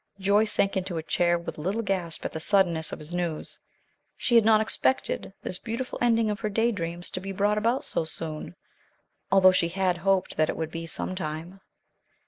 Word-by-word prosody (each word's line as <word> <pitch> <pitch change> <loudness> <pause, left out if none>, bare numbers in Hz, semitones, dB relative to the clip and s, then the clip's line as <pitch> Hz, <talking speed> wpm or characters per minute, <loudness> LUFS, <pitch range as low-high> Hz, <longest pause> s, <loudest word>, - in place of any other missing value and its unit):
Joyce 205 +3 +3
sank 200 +1 +2
into 185 -2 -2
a 160 - -3
chair 175 +1 +2
with 170 -2 -7
a - - -5
little 200 +8 -1
gasp 180 -5 -2
at - - -2
the 160 - -5
suddenness 170 -3 +2
of - - -5
his 155 +3 -10
news. 175 -3 -3 0.6
She 240 - -1
had 230 -1 +7
not 215 0 +5
expected 220 0 0
this 180 - -4
beautiful 240 +3 -4
ending 230 -2 +3
of 205 - -4
her 215 - -2
day 225 +3 +2
dreams 175 -3 -5
to - - -3
be 195 +1 -6
brought 205 +2 +1
about 235 +5 +1
so - - -1
soon, 155 - -2 0.8
although 190 -1 +7
she 180 -2 +2
had 185 0 0
hoped 195 +1 +1
that 155 0 +2
it - - -2
would 160 0 -3
be 165 0 -5
sometime. 175 +1 -5
185 Hz, 200 wpm, -27 LUFS, 165-210 Hz, 0.8 s, had